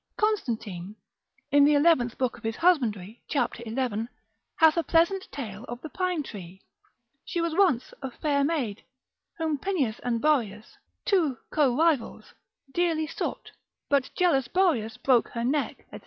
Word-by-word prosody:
Constantine, 225 - -2 0.6
in 285 0 +6
the 295 +1 +5
eleventh 285 -6 +3
book 255 -3 0
of 235 - -16
his 225 0 -2
husbandry, 235 - +1
cap. 280 - -1
11, 230 -1 -2 0.5
hath 320 -1 +5
a 335 - +2
pleasant 345 +4 +1
tale 220 -6 -6
of 240 -1 -7
the 315 - -6
pine 365 -4 -1
tree; 190 -6 -10 0.6
she 345 - -3
was 335 -1 0
once 345 -9 +2
a 265 - -4
fair 280 +2 0
maid, 275 -9 -1 0.5
whom 315 -3 -1
Pineus 275 - -1
and 235 -2 -1
Boreas, 225 -8 0 0.3
two 320 - +2
co 270 -5 +2
rivals, 315 -6 0 0.4
dearly 330 -3 +1
sought; - - -5 0.4
but 280 -2 +2
jealous 285 -9 +3
Boreas 275 - +1
broke 250 -4 +3
her 235 - -4
neck, 280 +4 -1
&c. - - -8
275 Hz, 150 wpm, -27 LUFS, 230-330 Hz, 0.6 s, in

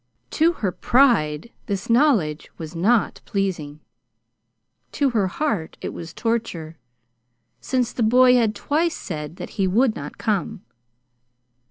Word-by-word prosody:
To 330 +2 +3
her 205 - -2
pride 230 - +2 0.2
this 200 -3 -3
knowledge 230 - +2
was 160 +1 -8
not 210 +7 +1
pleasing. 165 -7 -3 1.1
To 280 -2 +1
her 210 -5 +1
heart 200 - -2
it - - -5
was 165 -1 -8
torture 180 -9 -3 0.8
since 245 - -1
the - - -3
boy 250 +3 +5
had 230 -3 +2
twice 320 +3 0
said 150 -2 -6
that - - -8
he 190 - +3
would 225 +5 +2
not - - -8
come. 215 -1 -2
215 Hz, 130 wpm, -22 LUFS, 165-245 Hz, 1.1 s, boy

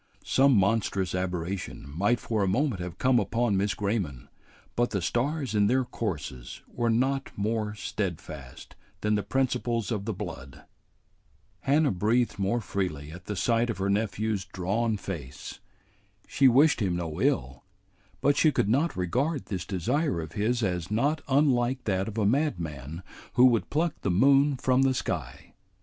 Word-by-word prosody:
Some 135 +1 +4
monstrous 100 -2 +1
aberration 90 -3 -3
might 100 +11 +1
for 110 -2 -1
a 100 - +2
moment 115 0 0
have 90 -1 -6
come 130 -1 +3
upon 115 -3 0
Miss 100 +1 0
Grayman, 100 - -2 0.5
but 120 0 +2
the 100 - -1
stars 130 - -1
in 105 -1 +3
their 130 +3 +2
courses 75 - -5
were 120 -1 -1
not 135 +4 +1
more 105 0 -1
steadfast 80 - -6 0.3
than 105 0 +1
the 105 - +2
principles 120 -3 -1
of 105 -3 -2
the 110 - -2
blood. 70 -9 -8 1.0
Hannah 145 +2 +2
breathed 110 +4 +1
more 100 +5 0
freely 80 -8 -3
at 90 +3 -11
the 105 - -4
sight 115 +4 +1
of 115 - -2
her 100 +1 0
nephew's 105 -1 -1
drawn 100 +4 -1
face. 80 -10 -7 0.7
She 135 - +4
wished 135 +3 +5
him 95 -4 +1
no 85 -3 -4
ill, 65 +2 0 0.6
but 140 +2 +3
she 155 - +4
could 100 - +1
not 140 - +1
regard 130 - -1
this 95 -4 -4
desire 115 - 0
of 80 -1 -6
his 115 +6 0
as 90 -4 -1
not 140 +8 +1
unlike 130 -2 +2
that 95 -2 0
of 110 0 -6
a 105 - +2
madman 85 - -1 0.3
who 125 - +6
would 120 -3 +3
pluck 160 +2 +1
the - - -1
moon 135 +8 +4
from 130 +1 +2
the 135 -1 +3
sky. 70 - -4
105 Hz, 160 wpm, -27 LUFS, 90-125 Hz, 1.0 s, who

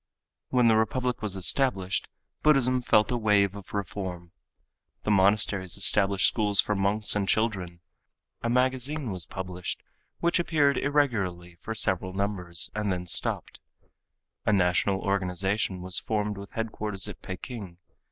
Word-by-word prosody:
When 125 -2 +3
the 110 - +5
republic 125 +3 -1
was 105 -3 -2
established 95 -1 0 0.3
Buddhism 130 -4 +3
felt 110 -1 +3
a 125 - 0
wave 105 -3 +2
of 100 -3 -11
reform. 95 -4 -5 0.7
The 105 - 0
monasteries 100 -1 +2
established 100 +2 +3
schools 105 -3 +4
for 105 - +3
monks 100 +2 +2
and 100 -2 -1
children. 95 -6 -1 0.6
A 115 - -1
magazine 130 +2 0
was 90 -4 -5
published 90 -2 -6 0.4
which 170 +1 +1
appeared 150 -5 +2
irregularly 105 -12 0
for 110 - -5
several 95 -3 0
numbers 95 -4 +1
and 105 -1 -1
then 90 -1 -3
stopped. 85 - 0 0.8
A - - +1
national 95 0 +2
organization 95 0 -1
was 90 0 +1
formed 105 -1 -2
with 100 0 -9
headquarters 105 -4 -2
at - - -9
Peking. 95 -1 -8
100 Hz, 135 wpm, -27 LUFS, 95-115 Hz, 0.8 s, the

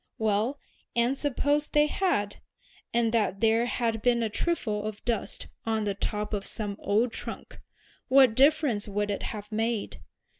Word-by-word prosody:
"Well, 220 +5 +1 0.4
and 240 +3 +3
suppose 290 +1 0
they 295 0 +4
had, 300 - 0 0.5
and 230 -1 +2
that 210 -4 +1
there 225 +2 +3
had 230 -3 -1
been 240 -1 +3
a 220 - -1
trifle 215 -8 -1
of 215 -1 -7
dust 235 -3 -2 0.2
on 220 -1 0
the 205 -1 0
top 210 +2 -3
of 200 -1 -2
some 205 -2 -4
old 225 +4 +1
trunk, - - -7 0.5
what 260 -3 +6
difference 270 -5 +3
would 205 0 -1
it 200 - -3
have 210 -1 -6
made? 225 0 -2
225 Hz, 155 wpm, -28 LUFS, 210-250 Hz, 0.5 s, what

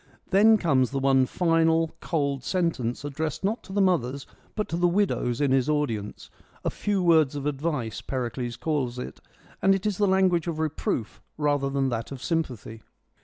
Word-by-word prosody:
Then 215 +3 +6
comes 135 - +2
the 135 - -3
one 135 -1 +3
final 165 -1 +2
cold 140 -5 -1
sentence 145 -9 -1
addressed 150 +3 -3
not 215 +5 0
to - - -11
the 200 0 +2
mothers, 140 -7 0 0.3
but 210 - -2
to 165 - -2
the 175 +1 +3
widows 175 - 0
in 145 -2 +2
his 135 +1 +2
audience: 115 -9 -2 0.2
' - - -29
a - - +1
few 200 -3 -1
words 160 -5 +4
of 140 -1 -4
advice/ 140 -7 -2
Pericles 120 0 -4
calls 135 -6 -2
it, 125 - -7 0.4
and 195 0 +5
it 195 +1 -4
is 210 -3 -1
the 205 - +3
language 185 -3 +2
of 165 -2 -2
reproof 150 -7 -2 0.2
rather 145 -2 +1
than 135 -1 0
that 115 0 -4
of 135 -2 -7
sympathy. 125 - -3
150 Hz, 180 wpm, -26 LUFS, 130-175 Hz, 0.4 s, Then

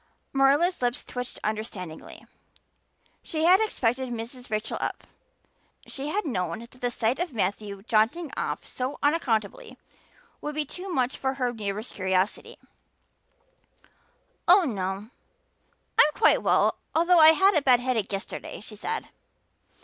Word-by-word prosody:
Marilla's 280 +6 +3
lips 245 0 0
twitched 250 0 -6
understandingly. 210 -6 -5 1.0
She 315 -2 -3
had 365 +3 +7
expected 260 - 0
Mrs. 240 +2 -7
Rachel 215 0 -2
up; - - -3 0.8
she 275 +1 -6
had 400 +6 -1
known 180 - -2
that 235 +2 -12
the 250 -1 -3
sight 235 +2 0
of 350 -5 -2
Matthew 200 -1 -2
jaunting 235 +9 +1
off - - -3
so 255 +2 -4
unaccountably 290 - 0 0.6
would 300 0 -4
be 305 -1 -1
too 365 +7 -7
much 260 -6 0
for 265 0 -1
her 250 -2 -1
neighbor's 210 0 -4
curiosity. 190 0 -1 1.9
"Oh, 365 +2 +7
no, 200 - -3 0.9
I'm 300 - +7
quite 445 - +4
well - - +2 0.2
although 340 +2 +5
I 315 0 +9
had 385 +5 +4
a 305 - +3
bad 255 -3 +5
headache 245 -5 -1
yesterday," 195 0 -5
she 215 +1 -10
said. 450 - -4
250 Hz, 135 wpm, -26 LUFS, 215-310 Hz, 1.9 s, I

